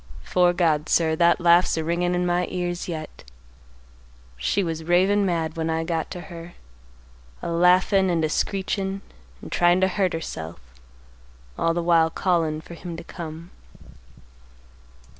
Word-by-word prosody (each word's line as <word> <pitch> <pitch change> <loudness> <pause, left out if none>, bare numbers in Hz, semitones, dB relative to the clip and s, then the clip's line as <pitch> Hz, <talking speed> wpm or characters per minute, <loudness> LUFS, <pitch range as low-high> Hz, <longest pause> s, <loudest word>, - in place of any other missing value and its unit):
'Fore 180 -1 +3
God, 160 -4 +1
sir, 160 -2 +2
that 170 +2 +3
laugh's 175 0 +4
a 160 - -1
ringin' 175 +2 0
in 180 0 0
my 175 0 +1
ears 175 -1 -3
yet. 155 -3 -7 1.1
She 65 - 0
was 165 -2 -4
ravin' 190 +4 +3
mad 165 -2 -1
when 165 0 -2
I 160 0 0
got 165 -1 -2
to 180 - -7
her, 170 -1 -10 0.9
a - - -3
laughin', 185 +3 +4
and 165 -2 +1
a - - +1
screechin', 195 +2 -2 0.4
and - - -9
tryin' 175 +1 +3
to 190 - +3
hurt 190 -1 0
herself, 80 - -6 1.0
all 165 0 0
the 175 - -1
while 165 -1 +4
callin' 165 -3 0
for 170 - -12
him 170 0 -7
to - - -8
come. 165 0 -8
175 Hz, 150 wpm, -24 LUFS, 160-180 Hz, 1.1 s, laugh's